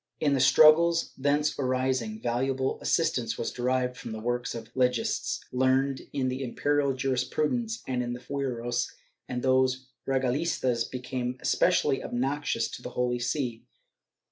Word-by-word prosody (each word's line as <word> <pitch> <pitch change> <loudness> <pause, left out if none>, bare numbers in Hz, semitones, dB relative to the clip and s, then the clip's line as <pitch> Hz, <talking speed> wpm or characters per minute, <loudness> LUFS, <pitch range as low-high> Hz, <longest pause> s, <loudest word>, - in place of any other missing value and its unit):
In 145 -2 +2
the 135 - +2
struggles 160 +5 +5
thence 145 +2 +1
arising, 130 -4 0
valuable 130 +2 -1
assistance - - 0
was - - -2
derived 125 0 0
from 115 -2 -7
the 110 - -5
works 120 +2 -2
of 115 +1 -8
legists, 125 -2 0
learned 130 +1 +1
in 135 -2 -1
the 130 +1 -2
imperial 140 +2 0
jurisprudence 125 -3 -1
and 125 -1 -1
in 120 0 -3
the 120 - -6
fueros, 125 -2 -2 0.4
and 125 -1 -3
these 130 0 +2 0.2
regalistas 130 -2 0
became 125 0 -4
especially - - +2
obnoxious 135 0 -1
to - - -8
the - - -6
Holy 125 0 +1
See. 120 -2 -2
130 Hz, 140 wpm, -28 LUFS, 125-135 Hz, 0.4 s, struggles